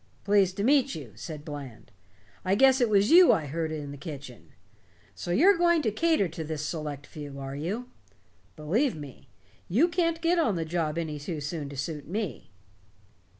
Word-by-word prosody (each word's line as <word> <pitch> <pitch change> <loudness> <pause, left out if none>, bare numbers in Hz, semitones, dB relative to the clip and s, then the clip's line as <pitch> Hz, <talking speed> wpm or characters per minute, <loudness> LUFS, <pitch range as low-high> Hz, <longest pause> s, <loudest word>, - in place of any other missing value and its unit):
"Pleased 195 -2 +3
to 200 - -1
meet 275 +2 +3
you," 140 -8 -8
said 150 - -8
Bland. 135 -7 -9 0.5
"I 190 +1 +2
guess 265 +3 +5
it 240 - +3
was 205 +2 +3
you 355 +1 +8
I 155 - +1
heard 160 +2 -3
in 145 -2 -5
the 145 - -8
kitchen. 140 - -9 0.6
So - - -8
you're 340 - +5
going 340 -2 +3
to 220 - +1
cater 315 - +2
to 165 0 -6
this 155 -1 -4
select 150 -3 -5
few, 145 -2 -9
are 135 0 -6
you? 195 - -4 0.7
Believe 195 - 0
me, 145 -4 -11 0.4
you 245 - +4
can't 335 -1 0
get 340 +1 +2
on 225 - +2
the 165 -1 -2
job 160 -1 -2
any 155 -3 -3
too 155 +2 -5
soon 145 0 -4
to 140 - -9
suit 145 +1 -4
me." 180 - -4
165 Hz, 185 wpm, -28 LUFS, 145-240 Hz, 0.7 s, you